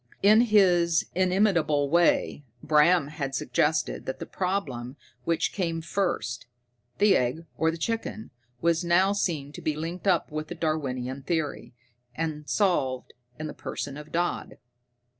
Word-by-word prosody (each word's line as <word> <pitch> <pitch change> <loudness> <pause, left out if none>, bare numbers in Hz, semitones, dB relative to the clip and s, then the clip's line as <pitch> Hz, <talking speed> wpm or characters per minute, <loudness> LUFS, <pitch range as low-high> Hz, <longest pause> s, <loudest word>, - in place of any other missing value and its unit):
In 215 +3 +7
his 175 -5 +4
inimitable 180 -6 +2
way, 170 -2 +2 0.2
Bram 155 0 +4
had 140 -3 -4
suggested 150 +5 0
that 130 - -3
the - - -6
problem 145 -10 -3 0.3
which 165 -1 0
came 165 -4 -1
first, 160 - -2 0.5
the 205 -1 +5
egg 130 +7 0
or 160 - +2
the 165 - -3
chicken, 220 +2 -3 0.3
was 170 +1 +2
now 180 +3 +3
seen 155 -8 -2
to - - -9
be 155 - -1
linked 170 +5 -5
up 175 -4 +2
with 155 0 -4
the 175 - -6
Darwinian 135 -5 -2
theory, 145 -6 -3 0.4
and 155 -2 -4
solved 135 -11 0 0.2
in 155 - -5
the 155 - -5
person 140 -1 -5
of 150 +1 -10
Dodd. 175 +1 -2
160 Hz, 140 wpm, -27 LUFS, 145-180 Hz, 0.5 s, In